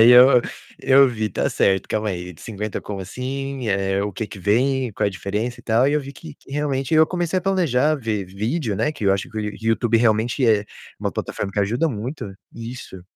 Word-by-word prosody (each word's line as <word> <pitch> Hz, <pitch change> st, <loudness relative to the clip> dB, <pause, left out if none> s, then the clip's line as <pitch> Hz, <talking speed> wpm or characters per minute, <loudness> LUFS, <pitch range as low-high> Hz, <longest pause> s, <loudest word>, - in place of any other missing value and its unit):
Aí 115 Hz, +2 st, +8 dB
eu 125 Hz, +1 st, +8 dB, 0.4 s
eu 135 Hz, 0 st, +6 dB
vi: 110 Hz, -3 st, -2 dB
"Tá -, -, -1 dB
certo, 95 Hz, -1 st, +2 dB
calma 110 Hz, 0 st, -1 dB
aí, 90 Hz, -2 st, -4 dB
de 75 Hz, -, -18 dB
50 105 Hz, -1 st, -4 dB
como 100 Hz, -2 st, -6 dB
assim? 130 Hz, +5 st, -4 dB
Eh, 95 Hz, 0 st, +1 dB
o 100 Hz, 0 st, -3 dB
que 110 Hz, -, -4 dB
que 105 Hz, -, -10 dB
vem? 125 Hz, +6 st, +1 dB
Qual -, -, -1 dB
é -, -, +3 dB
a -, -, -6 dB
diferença 105 Hz, +6 st, -3 dB
e -, -, -25 dB
tal?". 115 Hz, +3 st, +3 dB
E 145 Hz, -, +2 dB
eu 150 Hz, -, +2 dB
vi 140 Hz, 0 st, -9 dB
que 155 Hz, +2 st, -11 dB
que -, -, -20 dB
realmente 145 Hz, 0 st, -1 dB
eu 160 Hz, 0 st, +6 dB
comecei 175 Hz, +1 st, -1 dB
a -, -, -6 dB
planejar, 155 Hz, -7 st, +2 dB
ver 110 Hz, -5 st, -2 dB
vídeo, 110 Hz, -, -2 dB
né, 150 Hz, -, 0 dB
que 145 Hz, -8 st, -6 dB
eu 100 Hz, -, +5 dB
acho 95 Hz, 0 st, -2 dB
que 110 Hz, -, -12 dB
o -, -, 0 dB
Yo 105 Hz, -1 st, -3 dB
o -, -, -10 dB
YouTube 115 Hz, +1 st, +2 dB
realmente 115 Hz, +3 st, +2 dB
é 105 Hz, -2 st, +3 dB, 0.3 s
uma -, -, -2 dB
plataforma 100 Hz, -, -4 dB
que 100 Hz, -, 0 dB
ajuda 120 Hz, +11 st, +1 dB
muito. 115 Hz, -2 st, -5 dB, 0.2 s
Isso. 115 Hz, -5 st, -8 dB
115 Hz, 235 wpm, -22 LUFS, 105-135 Hz, 0.4 s, Aí